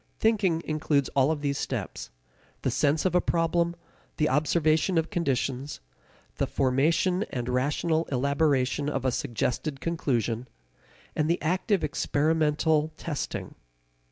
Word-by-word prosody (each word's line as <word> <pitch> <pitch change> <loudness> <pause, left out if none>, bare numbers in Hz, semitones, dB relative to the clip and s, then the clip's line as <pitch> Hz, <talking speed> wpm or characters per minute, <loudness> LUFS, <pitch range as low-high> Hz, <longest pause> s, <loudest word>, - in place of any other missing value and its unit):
Thinking 200 -7 +2
includes 150 -3 +1
all 135 +1 +2
of 155 -2 -1
these 140 -1 -1
steps, - - -4 0.5
the - - +1
sense 150 +4 +1
of 185 - +2
a 180 - +4
problem, 170 +1 +1 0.4
the 155 - +2
observation 155 +4 +2
of 165 0 0
conditions, 135 -3 -1 0.6
the - - 0
formation 155 +8 +2
and 120 -3 -4
rational 150 +6 +1
elaboration 140 0 +1
of 135 - -2
a 130 - +3
suggested 135 +3 -2
conclusion, 125 -8 -1 0.7
and 155 0 +1
the 170 - +2
active 185 +4 0
experimental 155 +1 +1
testing. 150 -4 -4
150 Hz, 125 wpm, -27 LUFS, 135-165 Hz, 0.7 s, a